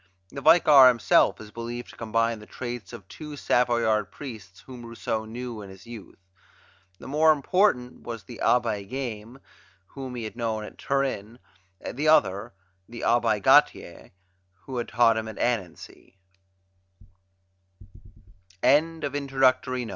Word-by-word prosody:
The 140 - -7
Vicar 145 -4 +7
himself 120 -3 +3
is 105 -1 -11
believed 120 +1 -7
to - - -16
combine 115 0 -1
the 105 - -14
traits 120 -2 -7
of 110 -6 -11
two 150 +3 -9
Savoyard 120 -5 +1
priests 110 -9 -10
whom 125 -2 -11
Rousseau 115 -1 -4
knew 120 0 -7
in 100 - -10
his 95 0 -14
youth. 115 -4 -11 0.8
The - - -12
more 155 +3 +4
important 145 -4 +1
was 115 -3 -7
the 115 +3 -11
Abbe 115 -5 +1
Gaime, 120 -2 -6 0.5
whom 130 -2 -8
he 120 - -5
had 110 - -7
known 110 -2 -3
at - - -11
Turin; 130 -5 -2 0.6
the 145 +5 -2
other, 110 -8 +3 0.4
the 120 0 -8
Abbe 115 -3 +2
Gatier, - - +2 0.5
who 130 -2 -7
had 120 - -3
taught 115 -1 +3
him 110 0 -3
at 110 - -8
Annecy. 95 -4 -4
120 Hz, 130 wpm, -25 LUFS, 110-125 Hz, 0.8 s, Vicar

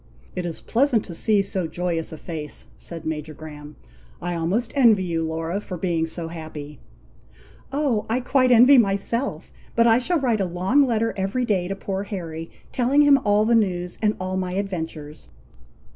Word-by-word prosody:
"It 180 -1 -2
is 165 - -5
pleasant 240 -2 +2
to 175 - -8
see 205 +4 +2
so 190 -3 -2
joyous 170 -1 -2
a 160 - -7
face," 155 -3 -6
said 165 -2 -8
Major 155 -1 -4
Graham. 150 -1 -10 0.4
"I 175 0 -3
almost 185 +8 -1
envy 230 -8 +5
you, 165 -2 -1
Laura, 165 +4 -2
for 185 -3 -6
being 165 -2 0
so 165 0 -5
happy." 155 -3 -8 0.9
"Oh! 275 -7 0
I 235 +3 +1
quite 255 0 +2
envy 250 +3 +8
myself! 230 +5 -1 0.2
but 230 - +4
I 230 0 +5
shall 335 +7 +1
write 235 -6 +1
a - - +1
long 185 +11 +2
letter 230 -1 0
every 195 +6 -1
day 190 -6 0
to 195 - -3
poor 195 0 -3
Harry, 165 -5 -6 0.2
telling 265 +3 +3
him 285 -1 +6
all 205 +1 +3
the 235 - +3
news, 180 -5 0
and 215 -1 +2
all 185 0 -2
my 185 -1 -2
adventures." 160 -6 -5
190 Hz, 175 wpm, -23 LUFS, 165-230 Hz, 0.9 s, envy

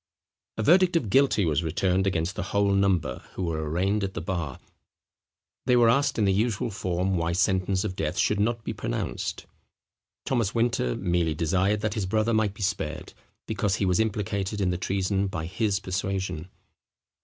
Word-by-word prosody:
A 110 - -1
verdict 180 - +5
of 120 -12 0
guilty 135 -7 +4
was 75 -1 +1
returned 90 +4 +1
against 90 0 -1
the - - -3 0.2
whole 100 -1 +3
number 95 -10 +1
who 95 - -4
were 80 -2 -2
arraigned 95 +6 0
at 95 -1 -3
the - - -2
bar. 85 -5 -3 1.1
They 125 - +5
were 120 -2 +6
asked 140 +3 +1
in 105 - +2
the 95 - +3
usual 110 +2 0
form 95 0 -1
why 85 0 0
sentence 95 +1 +1
of 100 -3 -3
death 75 -3 -2
should 105 - +2
not 115 +2 0
be - - -3
pronounced. - - -3 0.8
Thomas 115 -5 0
Winter 115 - +1
merely 85 -3 0
desired 95 +6 +1
that 105 -1 -1
his 105 -4 -2
brother 110 +3 +1
might 110 -2 +1
be 105 - -5
spared, 80 -6 -3 0.3
because 100 -2 0
he 100 - 0
was 90 -1 +2
implicated 105 -2 -1
in 95 -2 +1
the 90 - -1
treason 95 +1 0
by 80 -4 -4
his 100 +3 0
persuasion. 95 -3 -3
95 Hz, 180 wpm, -26 LUFS, 90-105 Hz, 1.1 s, were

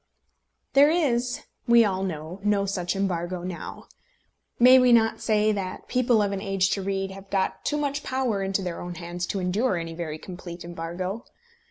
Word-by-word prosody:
There 280 +2 +7
is, 255 -5 +1 0.3
we 235 -1 +7
all 190 -2 -1
know, 170 -1 -4
no 205 -1 +2
such 185 -2 -2
embargo 180 -2 -2
now. 180 -1 -7 0.7
May 255 +2 +8
we 250 -1 +5
not 225 -1 +4
say 215 -1 +2
that 195 -3 -4
people 245 -4 +3
of 200 - -1
an 195 -1 -3
age 195 -1 +1
to 200 - 0
read 195 0 -2
have 195 0 -11
got 190 -1 -1
too 295 - 0
much 290 0 -1
power 255 -8 -1
into 195 0 -1
their 175 -2 -4
own 175 0 -6
hands 175 0 -5
to 195 - -2
endure 190 +4 +1
any 165 -1 -5
very 165 -2 -5
complete 175 0 -9
embargo? 175 +5 -5
195 Hz, 180 wpm, -26 LUFS, 180-235 Hz, 0.7 s, May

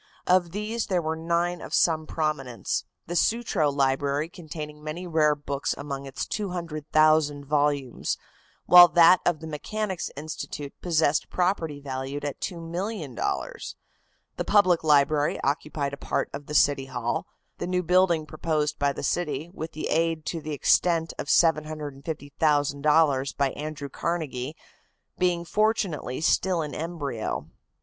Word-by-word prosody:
Of 180 -1 +3
these 210 +5 -3
there 185 -3 +1
were 160 -1 -2
nine 170 +2 -1
of - - -3
some 160 -2 +2
prominence, 150 -7 -2 0.2
the 175 - -5
Sutro 175 -4 +2
Library 140 +2 0
containing 150 -3 -8
many 155 +4 -5
rare 155 -3 +3
books 140 -1 -3
among 140 -1 -5
its 135 - -4
200,000 155 -5 +1
volumes, 145 -3 0 0.5
while 175 0 +10
that 170 +2 +6
of 165 -3 +1
the - - -7
Mechanics 190 +5 -3
Institute 145 -1 -6
possessed 160 -4 +1
property 175 -5 0
valued 135 +1 -5
at 145 - -4
$2,000,000. 170 - -4 0.6
The - - -1
Public 185 -5 +4
Library 150 0 +3
occupied 140 0 -1
a - - -5
part - - -2
of 140 0 -7
the 150 - -4
City 140 -2 +4
Hall, 130 - -2 0.3
the - - -3
new 180 0 0
building 175 -2 +3
proposed 155 -1 -2
by 140 0 +2
the - - -6
city, 160 +1 -1
with 160 -3 -5
aid 165 0 0
to 165 - -3
the 155 - -7
extent 165 +3 +2
of - - -4
$750,000 150 -2 +1
by 140 -2 +2
Andrew 150 -1 -6
Carnegie, 150 -5 -3 0.6
being 175 -1 +1
fortunately 195 - 0
still 175 +1 +2
in 150 - -6
embryo. 150 -8 -4
155 Hz, 135 wpm, -26 LUFS, 145-170 Hz, 0.6 s, while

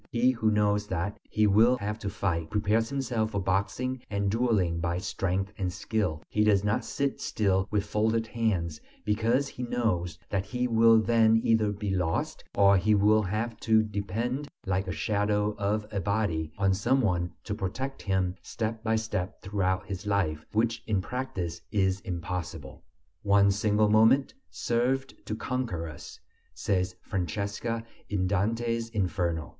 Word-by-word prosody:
He 120 +2 +3
who 115 -3 +1
knows 105 -1 +2
that 95 +2 -3
he 110 - +2
will 110 +5 +5
have 105 0 -4
to 100 - -3
fight, 85 -5 -2
prepares 105 +3 +1
himself 125 -5 -1
for 100 - -2
boxing 100 +7 -1
and 100 -1 0
dueling 105 -8 +1
by 85 +1 -1
strength 95 +1 -2
and 90 -2 -1
skill; 90 -6 -2
he 105 - +1
does 100 -2 +4
not 105 +1 +1
sit 140 -1 -2
still 95 -2 +1
with 105 -1 0
folded 110 +2 +1
hands, 95 -10 -1 0.2
because 115 +6 +2
he 125 - -8
knows 110 -9 -1
that 95 -2 0
he 125 +4 -1
will 115 -1 +6
then 115 0 +4
either 110 -2 +3
be 100 0 -3
lost 90 -4 -1
or 100 -1 +6
he 105 +3 +3
will 105 +2 +4
have 110 +4 -2
to 110 -1 +4
depend, 110 +7 -3 0.2
like 95 0 0
the 95 - -3
shadow 105 +4 0
of 105 +1 0
a 100 - -1
body, 90 -5 -1
on 95 -1 +3
some 105 +8 +2
one 90 -6 0
to 105 - -4
protect 115 +7 -4
him 95 -3 0
step 110 0 -4
by 110 -1 +2
step 110 -3 -3
throughout 95 -1 0
his 100 0 -6
life, 85 -7 0
which 115 +1 +1
in 105 -3 +1
practise 95 -7 -4
is 95 -2 +1
impossible. 85 -6 -5 0.4
One 100 0 +4
single 105 +1 +2
moment 110 +6 +4 0.2
served 130 +3 0
to 110 - -2
conquer 110 -10 -3
us, 75 - -10 0.4
says 90 -2 -1
Francesca, 100 +6 -2 0.3
in 95 -3 0
Dante's 115 +4 0
Inferno. 90 -6 -1
105 Hz, 160 wpm, -28 LUFS, 95-115 Hz, 0.4 s, will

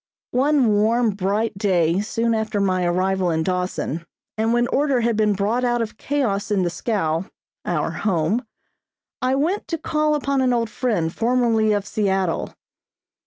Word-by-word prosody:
One 275 +2 +3
warm, 225 +2 +2
bright 205 +3 -1
day 180 -3 +2
soon 230 +2 0
after 220 -1 -1
my 185 -2 +1
arrival 185 +1 +1
in 160 -1 0
Dawson, 180 -3 -2 0.3
and 220 +1 0
when 240 0 +3
order 275 -3 +1
had 230 -1 +1
been 210 -1 +2
brought 210 +6 0
out 240 -1 +1
of 225 -2 -4
chaos 235 -8 -1
in 200 -3 +1
the 175 - -1
scow 170 -6 -1 0.4
our - - -1
home 195 +3 0 0.8
I 255 +1 +1
went 335 +9 -1
to 330 - -2
call 305 -1 0
upon 280 -2 0
an 255 -1 +2
old 230 -2 0
friend, 190 -11 -1
formerly 230 -2 +2
of 205 -1 0
Seattle. 195 -5 -1
215 Hz, 160 wpm, -22 LUFS, 190-245 Hz, 0.8 s, One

